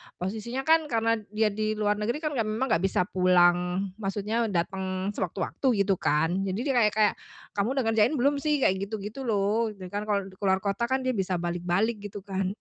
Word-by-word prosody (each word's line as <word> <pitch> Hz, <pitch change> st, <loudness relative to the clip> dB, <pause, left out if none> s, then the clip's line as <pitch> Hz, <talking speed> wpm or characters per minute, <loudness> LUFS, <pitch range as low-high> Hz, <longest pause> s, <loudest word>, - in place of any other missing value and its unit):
posisinya 220 Hz, +8 st, -4 dB
kan 320 Hz, +1 st, +4 dB
karena 230 Hz, -3 st, +1 dB, 0.2 s
dia 215 Hz, -1 st, +2 dB
di 215 Hz, +1 st, -1 dB
luar 210 Hz, -1 st, 0 dB
negeri 240 Hz, +9 st, -2 dB
kan, 305 Hz, -, 0 dB
ya 250 Hz, -6 st, 0 dB
memang 225 Hz, +4 st, -1 dB
gak 165 Hz, +2 st, +2 dB
bisa 185 Hz, -, +1 dB
pulang 180 Hz, +1 st, +3 dB
maksudnya 210 Hz, +3 st, -1 dB
dateng 190 Hz, +1 st, -2 dB
sewaktu-waktu 190 Hz, -, -3 dB, 0.2 s
gitu 195 Hz, -1 st, +2 dB
kan. 160 Hz, +5 st, +1 dB
Jadi 190 Hz, +2 st, -2 dB
dia 275 Hz, -1 st, 0 dB
kayak 210 Hz, -2 st, +3 dB
kayak, 215 Hz, -1 st, +4 dB, 0.4 s
"Kamu 210 Hz, +6 st, 0 dB
udah 265 Hz, -, +1 dB
ngerjain 225 Hz, +6 st, +3 dB
belum 280 Hz, +2 st, +2 dB
sih?" 295 Hz, -2 st, +1 dB
Kayak 190 Hz, +1 st, +1 dB
gitu 220 Hz, -, -4 dB
gitu 210 Hz, +6 st, -7 dB
loh, 215 Hz, +1 st, +1 dB
gitu 195 Hz, -, -11 dB
kan 205 Hz, +1 st, -3 dB
kalo 200 Hz, -2 st, -1 dB
keluar 190 Hz, -1 st, +2 dB
kota 205 Hz, +4 st, 0 dB
kan 260 Hz, +1 st, 0 dB
dia 255 Hz, -, +1 dB
bisa 190 Hz, -2 st, -1 dB
balik-balik 175 Hz, +6 st, -1 dB
gitu 205 Hz, -1 st, -7 dB
kan, 190 Hz, -1 st, -2 dB
205 Hz, 200 wpm, -27 LUFS, 190-230 Hz, 0.4 s, kan